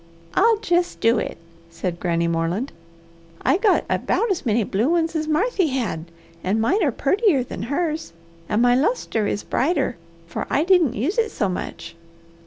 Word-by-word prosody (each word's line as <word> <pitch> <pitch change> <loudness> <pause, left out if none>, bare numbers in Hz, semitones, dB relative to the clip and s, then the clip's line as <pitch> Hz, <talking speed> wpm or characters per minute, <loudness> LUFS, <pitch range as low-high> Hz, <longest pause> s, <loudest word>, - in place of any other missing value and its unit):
"I'll 450 +2 +4
jest 350 -4 0
do 230 +2 +3
it!" - - -4 0.3
said 170 +1 -4
Granny 170 -1 0
Moreland. 170 +10 -1 0.7
"I 265 +8 +3
got 405 0 +2
about 460 -2 0
as 340 -8 -2
many 225 +1 +2
blue 210 +7 0
ones 330 -1 +1
as 310 -1 -1
Marthy 370 +4 +1
had 235 - -2 0.4
an' 200 +4 +1
mine 360 - +2
are 290 - +2
purtier 310 - +2
than 190 -6 -7
hers. 300 - -2 0.4
And 215 +3 +2
my 245 0 +5
lustre 255 - +1
is 205 - -2
brighter, 285 - 0 0.3
for 170 - -5
I 290 - +2
didn't 350 -7 +3
use 310 - 0
it 450 -1 +2
so 205 - -1
much. 180 - -6
275 Hz, 170 wpm, -22 LUFS, -, 0.7 s, my